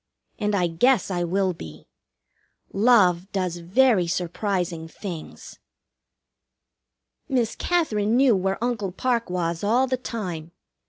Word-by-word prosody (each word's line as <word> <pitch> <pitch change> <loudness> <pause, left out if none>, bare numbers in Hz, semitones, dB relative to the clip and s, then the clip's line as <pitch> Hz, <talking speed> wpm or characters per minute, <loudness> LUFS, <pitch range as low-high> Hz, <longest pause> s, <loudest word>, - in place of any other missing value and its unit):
And 210 -1 0
I 180 -3 +2
guess 200 +8 +2
I 175 -1 -1
will 185 +2 0
be. 80 - -11 0.9
Love 195 -5 +3
does 185 -3 -2
very 185 +2 +3
surprising 175 -1 -2
things. 170 -1 -9 1.7
Miss 245 -4 0
Katherine 230 -11 +1
knew 260 -4 +5
where 190 +3 -1
Uncle 220 -6 -1
Parke 235 +2 -1
was 170 -1 -2
all 235 +6 +3
the 260 0 -1
time. 180 -10 -6
195 Hz, 115 wpm, -24 LUFS, 175-235 Hz, 1.7 s, knew